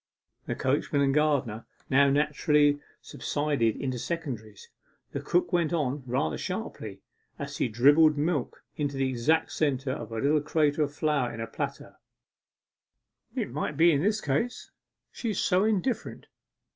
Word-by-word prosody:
The - - -2
coachman 140 +1 +1
and 135 -1 +2
gardener 140 -7 +1 0.2
now 140 +1 +4
naturally 150 0 +3 0.2
subsided 145 -7 -1
into 130 -3 -3
secondaries. 120 -11 -5 0.4
The - - -3
cook 180 +1 0
went 175 -1 +2
on 145 -3 -1
rather 100 -11 -1
sharply, - - -5 0.3
as - - -6
she - - 0
dribbled 145 +7 +5
milk 150 -3 -1
into 145 -2 -2
the 135 0 +1
exact 130 +6 +1
centre 135 -3 0
of 115 - -6
a 115 - -4
little 145 +5 +2
crater 150 0 +1
of 145 -1 +1
flour 145 -4 0
in 115 - -8
a 115 - -2
platter 110 - -6 1.4
'It - - -2
might 145 - -3
be 170 +2 +6
in 145 -2 +2
this 210 +4 +1
case; 150 - -2 0.4
she's 220 -5 -3
so 185 +2 +2
indifferent. 220 +3 -1
145 Hz, 145 wpm, -28 LUFS, 130-155 Hz, 1.4 s, be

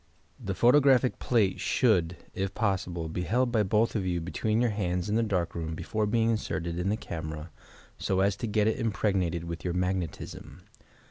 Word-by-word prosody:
The 95 -1 -2
photographic 130 +1 +4
plate 110 -6 +1
should, 90 -9 +2 0.2
if 95 0 -3
possible, 95 -6 -1
be 80 +3 -3
held 120 +7 +1
by 110 -3 +3
both 105 +4 +1
of 105 - 0
you 90 -2 -1
between 105 +6 -1
your 120 -2 +2
hands 90 -3 -1
in 105 - -1
the 115 - +3
dark 95 -6 -1
room, 80 -1 -4
before 105 +6 -2
bemg 115 +1 +2
inserted 85 -6 -2
in 90 +2 0
the 105 - +1
camera, 80 -4 -6 0.5
so 95 0 +1
as 100 0 +2
to 115 - -3
get 105 0 +2
it 110 - +1
impregnated 95 -6 0
with 85 0 -6
your 90 -1 -2
"magnetism." 90 -2 -3
95 Hz, 185 wpm, -28 LUFS, 85-110 Hz, 0.5 s, photographic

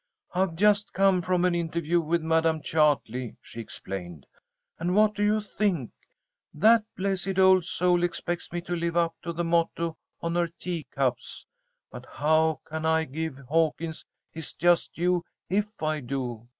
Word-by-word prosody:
"I've 185 -2 0
just 205 +3 +3
come 195 -1 +3
from 180 +1 +1
an 180 - +2
interview 170 0 0
with 165 +1 0
Madam 160 0 +2
Chartley," 135 -6 +1
she 115 - -11
explained. 90 - -7 0.5
"And 175 +2 0
what 210 0 +5
do 205 - -4
you 210 +1 +3
think? 195 - -1 0.6
That 220 +8 +5
blessed 195 -1 -1
old 190 -2 +6
soul 180 0 +2
expects 175 0 -3
me 175 0 -3
to 175 +1 -3
live 170 0 -1
up 170 -1 +2
to 170 - -4
the 170 +1 -2
motto 165 -1 0 0.2
on 170 0 -2
her 175 0 +1
teacups! 150 -7 -3 0.5
But - - -10
how 155 +1 +2
can 160 0 -5
I 160 0 +3
give 160 -1 -4
Hawkins 160 +1 0 0.3
his 160 -1 -7
just 175 0 +2
due 175 0 +1 0.3
if 205 +2 +2 0.2
I 155 0 0
do? 120 -3 -4
170 Hz, 155 wpm, -27 LUFS, 155-180 Hz, 0.6 s, old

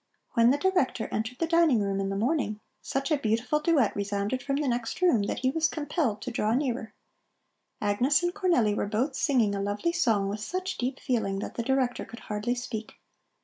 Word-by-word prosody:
When 230 0 +5
the 275 - +3
Director 290 -9 +1
entered 220 +3 -2
the 330 - 0
dining 330 -7 +4
room 200 -1 -1
in 195 0 -1
the 195 - -2
morning, 220 -1 0 0.2
such 275 +3 -2
a 305 - +4
beautiful 230 +6 +1
duet 300 -8 +2
resounded 205 +4 -1
from 275 +2 -1
the 290 0 0
next 240 -2 -2
room 350 - +4
that - - -3
he 260 0 +2
was 325 +2 +2
compelled 295 - -2
to 250 - -4
draw 220 0 +1
nearer. 250 -4 -2 0.8
Agnes 245 +10 +2
and 350 0 0
Cornelli 340 - +2
were 205 - -1
both 245 +7 -1
singing 245 -10 +2
a 200 - -2
lovely 205 +11 -1
song 225 - +2
with 205 +2 -3
such 370 - -4
deep 255 +2 -2
feeling 220 -6 -1
that 195 - -5
the - - -2
Director 255 0 0
could 235 - -11
hardly 210 +4 -2
speak. 235 -3 -5
245 Hz, 200 wpm, -28 LUFS, 215-290 Hz, 0.8 s, When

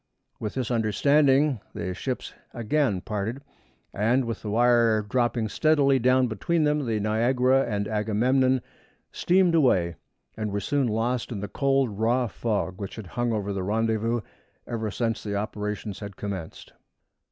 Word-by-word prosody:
With 105 - -4
this 130 -2 -2
understanding 135 +4 +3 0.2
the 90 - -3
ships 130 +7 -4 0.2
again 120 -4 0
parted, 110 +7 -4 0.5
and, 120 +5 +2
with 115 -1 -4
the 105 - -5
wire 115 -1 +3
dropping 120 0 0
steadily 140 +2 +3
down 130 +1 +3
between 155 - 0
them, 150 -2 +1
the 110 -2 0
Niagara 125 +5 +2
and 100 -1 -1
Agamemnon 125 +5 +2 0.5
steamed 180 -1 +2
away, 95 - +3 0.4
and 110 -1 -3
were 100 - -1
soon 140 +4 0
lost 115 +3 -1
in 110 - -4
the 105 - -4
cold, 135 -4 0
raw 120 +3 +2
fog, 105 -2 -3
which 100 - -6
had 110 - -8
hung 120 -1 0
over 100 -2 -2
the 95 - -3
rendezvous 110 +3 0 0.4
ever 110 -2 -3
since 115 +2 -2
the 100 -1 -4
operations 105 0 -4
had 100 -2 -8
commenced. 95 -5 -6
115 Hz, 150 wpm, -26 LUFS, 105-130 Hz, 0.5 s, understanding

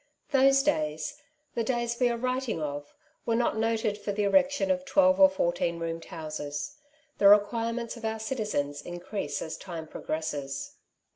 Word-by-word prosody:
Those 275 0 +5
days 155 - -1
— 300 -1 -45
the 230 - 0
days 235 0 -1
we 250 -1 +4
are 235 - -1
writing 255 -4 -1
of 145 -1 -5
— - - -41
were 230 - +2
not 235 -1 +1
noted 220 -2 0
for 205 0 -3
the 205 +1 -1
erection 285 +6 +3
of 275 0 0
twelve 280 0 +4
or 285 0 +9
fourteen 175 -9 0
roomed 165 0 -4
houses. 155 - -5 0.4
The 200 - +6
requirements 230 +3 +3
of 225 - -7
our 220 0 -1
citizens 210 - -2
increase 175 -3 -4
as 160 0 -5
time 170 -4 -7
progresses. 145 -4 -4
220 Hz, 165 wpm, -28 LUFS, 160-255 Hz, 0.4 s, or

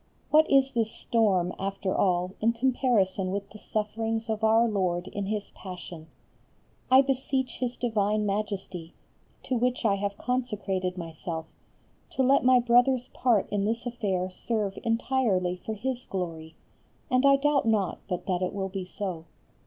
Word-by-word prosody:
What 310 +1 +5
is 270 -1 +4
this 230 -3 0
storm 190 -6 +1
after 195 -1 -2
all 180 -1 +1
in 230 +2 +3
comparison 230 -7 +1
with 200 +1 -4
the 215 - -12
sufferings 225 +1 -2
of 220 0 -3
Our 225 +2 +5
Lord 185 -4 -1
in 200 -1 -4
His 210 0 -3
Passion? 175 -4 -9 0.8
I 260 +1 +7
beseech 265 -1 -1
His 250 -1 -2
divine 215 -3 +1
Majesty, 195 -4 -3 0.5
to 260 - -1
which 250 0 0
I 205 - +4
have 200 0 -3
consecrated 205 -7 -2
myself, 165 -1 -5 0.7
to 265 - +1
let 270 +2 +4
my 255 0 +6
brother's 245 +1 +3
part 235 -6 +2
in 205 -1 0
this 230 +3 -1
affair 195 -6 -2
serve 205 0 -2
entirely 225 -6 +1
for 220 - -3
His 250 +3 -3
glory, 165 -4 -5 0.6
and 255 +1 +3
I 275 0 +7
doubt 280 -2 +2
not 205 -5 +1
but 180 -3 -3
that 185 -2 -1
it 185 - -1
will 195 -1 -2
be 190 -1 -4
so. 180 -3 -5
210 Hz, 155 wpm, -27 LUFS, 185-245 Hz, 0.8 s, I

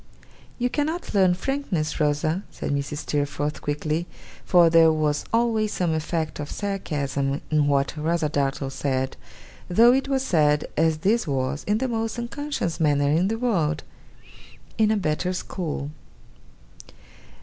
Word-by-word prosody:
'You 245 - +1
cannot 310 +6 -2
learn 190 -3 +4
frankness, 185 - -2
Rosa,' 155 +4 +1
said - - -5
Mrs. 140 +1 -2
Steerforth 145 0 -2
quickly 155 +3 -2 0.4
for 175 -2 +5
there 165 -1 +6
was 150 -1 0
always 225 -2 +1
some 175 -3 0
effect 160 0 -2
of 145 - -5
sarcasm 140 -8 -2
in 150 -1 +3
what 140 0 +1
Rosa 160 +1 0
Dartle 140 -2 -1
said, 135 -1 -2 0.5
though 230 +7 +6
it 270 +1 +1
was 270 -1 0
said, 150 - +3
as 160 0 +2
this 220 -2 +2
was, 135 +1 -1
in 210 +1 +1
the 260 +3 -1
most 225 -1 -2
unconscious 235 - -3
manner 145 -2 +2
in 170 +5 +3
the 225 +2 -1
world 170 -11 0 0.9
'in 220 -1 +3
a 220 - +2
better 180 0 -1
school. 155 -6 -4
160 Hz, 140 wpm, -24 LUFS, 145-215 Hz, 0.9 s, there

